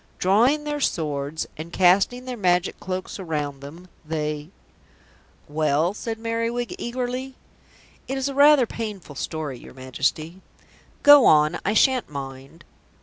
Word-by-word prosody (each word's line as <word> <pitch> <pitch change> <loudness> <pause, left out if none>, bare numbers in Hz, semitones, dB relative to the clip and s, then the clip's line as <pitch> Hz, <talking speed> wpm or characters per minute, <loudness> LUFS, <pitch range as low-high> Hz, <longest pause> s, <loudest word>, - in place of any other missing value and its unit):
Drawing 240 +11 +3
their 295 0 -3
swords 150 - -2
and 160 +2 -8
casting 195 +8 +3
their 255 -1 -5
Magic 180 -4 +1
Cloaks 185 +2 -5
around 150 -6 -3
them, 165 +6 -11 0.2
they 150 -1 -4 0.5
" - - -32
"Well?" 155 +4 +2
said 225 +1 -5
Merriwig 230 +1 -2
eagerly. 255 +2 -4 0.7
"It 270 - -3
is 270 +1 -1
rather 285 0 +6
a - - +1
painful 210 -9 -7
story, 145 -2 -5
your - - -14
Majesty." 150 +7 -3 0.6
"Go 290 -3 +9
on, 155 +2 +4
I 210 - 0
shan't 260 +1 +3
mind." 135 +2 -9
185 Hz, 135 wpm, -23 LUFS, 150-245 Hz, 0.7 s, Go